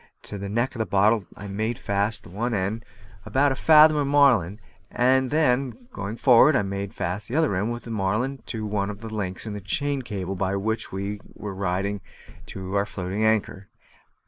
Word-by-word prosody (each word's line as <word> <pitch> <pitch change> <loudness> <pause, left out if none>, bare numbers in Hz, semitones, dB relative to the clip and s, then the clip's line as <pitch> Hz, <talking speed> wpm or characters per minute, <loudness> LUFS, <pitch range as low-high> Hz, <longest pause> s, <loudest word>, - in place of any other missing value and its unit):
To 100 - -6
the 100 0 -5
neck 120 +5 0
of 115 - -8
the 110 - -1
bottle 105 0 +3
I 105 - -8
made 110 +4 -2
fast 100 +2 -1
the - - -13
end 120 +2 -1 0.7
of - - -14
about 140 +1 +3
a - - 0
fathom 155 +1 +6
of 145 -1 +1
marline, 125 -10 +4 0.3
and 130 +1 +2
then, 140 - 0
going 100 +3 -5
forward, 130 +4 +6
I 125 - +2
made 100 0 -4
fast 95 +3 -3
the 125 - -4
other 160 - +2
end 105 +5 -1
of 120 -1 -5
the 115 - -8
marline 110 +6 -1
to 110 -2 -4
one 105 -1 -1
of 105 0 -7
the 110 -1 -7
links 95 -3 -3
of 110 - -5
the 105 - -6
chain 140 +8 -1
cable 95 -6 -4
by 95 +1 -1
which 110 +3 -2
we 100 +2 -4 0.2
were 105 -2 -6
riding 95 +1 -2 0.5
to 95 0 -7
our 100 +1 +1
floating 95 +3 -3
anchor. 105 -3 0
105 Hz, 200 wpm, -25 LUFS, 100-125 Hz, 0.7 s, fathom